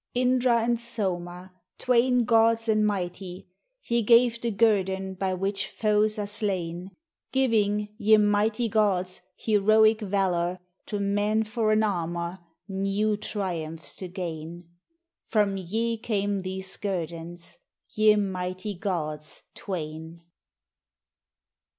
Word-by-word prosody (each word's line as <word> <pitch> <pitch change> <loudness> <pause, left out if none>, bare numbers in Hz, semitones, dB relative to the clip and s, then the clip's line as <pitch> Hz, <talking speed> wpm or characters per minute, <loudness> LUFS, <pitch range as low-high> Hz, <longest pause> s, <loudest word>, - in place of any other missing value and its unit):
Indra 250 -2 +3
and 235 0 +1
Soma, 185 -5 -4 0.2
Twain 250 0 +3
gods 225 0 +3
and 215 -1 +3
mighty, 185 -2 -4 0.4
Ye 235 0 +1
gave 235 +1 +4
the 235 - 0
Guerdon 195 -3 +1
by 190 0 -1
which 195 +2 -2
foes 215 0 +1
are 210 - -2
slain; 190 -4 -2 0.4
Gi\'ing, 210 -5 +1
ye 215 0 +6
mighty 210 +2 +2
gods, 195 -4 +1 0.2
heroic 215 +1 +4
Valor 185 -3 0 0.3
To 205 - -3
men 205 +2 +1
for 220 0 0
an 215 0 +3
Armor, 170 -2 -2 0.3
new 195 +2 0
triumphs 175 -7 -4
to 185 - -6
gain; 170 -2 -6 0.3
— 340 0 -56
From 210 -3 +2
ve 220 +5 -2
came 205 -3 -1
these 190 0 -4
Guerdons, 170 -3 -5 0.4
ve 215 0 +5
mightv 185 -1 -3
gods 155 -5 -3
Twain. 160 -2 -6
200 Hz, 115 wpm, -26 LUFS, 180-220 Hz, 0.4 s, ye